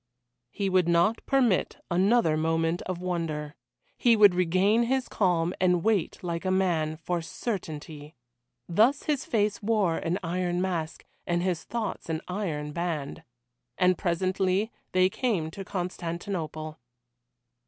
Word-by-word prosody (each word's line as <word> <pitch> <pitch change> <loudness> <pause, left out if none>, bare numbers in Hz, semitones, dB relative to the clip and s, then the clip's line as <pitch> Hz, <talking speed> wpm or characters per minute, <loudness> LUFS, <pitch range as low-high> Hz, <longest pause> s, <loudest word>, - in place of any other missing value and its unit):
He 200 - -2
would 185 -2 +2
not 170 +6 +3
permit 255 -8 +2
another 190 -1 +3
moment 165 +2 0
of 185 -1 -2
wonder. 165 -5 -3 0.5
He 235 -2 +5
would 205 -3 +7
regain 185 +5 +3
his 260 +1 0
calm 175 -3 +1
and 180 -2 +3
wait 215 -6 +1
like 170 -1 -3
a 185 - -1
man 175 -5 +1
for 175 +1 -2
certainty. 155 -6 -6 0.5
Thus 225 +11 +3
his 295 -3 -1
face 210 -2 0
wore 205 -6 +1
an 170 +2 -1
iron 175 +1 -1
mask 170 -4 -3 0.2
and 175 0 +1
his 180 -3 -1
thoughts 230 -7 -4
an 160 0 -1
iron 165 -6 -3
band. 160 -4 -3 0.6
And 180 0 +4
presently 185 +4 0 0.2
they 185 0 +4
came 185 -6 -1
to 195 - -7
Constantinople. 170 -3 -4
180 Hz, 130 wpm, -27 LUFS, 165-200 Hz, 0.6 s, would